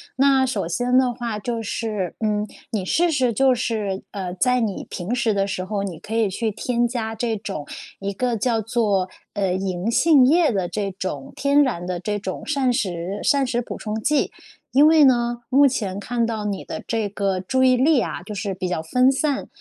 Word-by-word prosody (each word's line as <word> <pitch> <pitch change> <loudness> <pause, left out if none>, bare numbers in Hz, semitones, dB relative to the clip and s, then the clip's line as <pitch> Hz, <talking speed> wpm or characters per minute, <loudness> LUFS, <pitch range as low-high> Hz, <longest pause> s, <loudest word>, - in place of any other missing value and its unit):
那 270 0 +4
首 260 -9 -1
先 245 +8 +1
的 255 -2 +3
话 235 -3 -4
就 230 +2 -3
是， 210 -4 -3
嗯， 210 -1 0 0.2
你 210 -4 -1
试 335 - +2
试 260 -5 +2
就 260 +4 +3
是， 215 -5 -2
呃， 185 -3 -4
在 250 +8 +2
你 215 -5 -2
平 180 +6 -4
时 240 -2 +1
的 200 -1 +1
时 190 -2 -3
候 200 +1 -3
你 180 -5 -5
可 220 - -6
以 220 -4 +2
去 225 +4 -1
添 240 +3 0
加 230 -2 -3
这 225 0 -2
种 195 -8 -6 0.3
一 200 0 -3
个 240 +4 -1
叫 225 +1 +1
做， 210 -4 0 0.3
呃， 195 -3 0
银 185 +1 -2
杏 290 0 +5
液 320 +3 +4
的 190 -5 -1
这 200 +3 -2
种 195 +9 -5
天 280 +1 +3
然 240 -11 0
的 180 -1 -3
这 205 +3 -2
种 190 -2 -5
膳 275 -4 +1
食 190 -4 -2
膳 280 -1 +3
食 245 -1 -1
补 - - -7
充 215 0 -4
剂。 300 +4 +1 0.4
因 285 +3 +6
为 315 -1 +6
呢， 240 -2 +3
目 280 +2 +6
前 200 -7 -2
看 235 +3 -1
到 220 -2 -3
你 200 -2 -3
的 - - -6
这 225 -2 0
个 195 -2 -1
注 260 +8 0
意 255 -1 +5
力 275 +1 +4
啊， - - -5
就 210 +3 -7
是 200 -1 -3
比 185 - -3
较 180 -3 -2
分 250 +11 +3
散， 275 +1 -1
225 Hz, 225 characters per minute, -22 LUFS, 195-255 Hz, 0.4 s, 因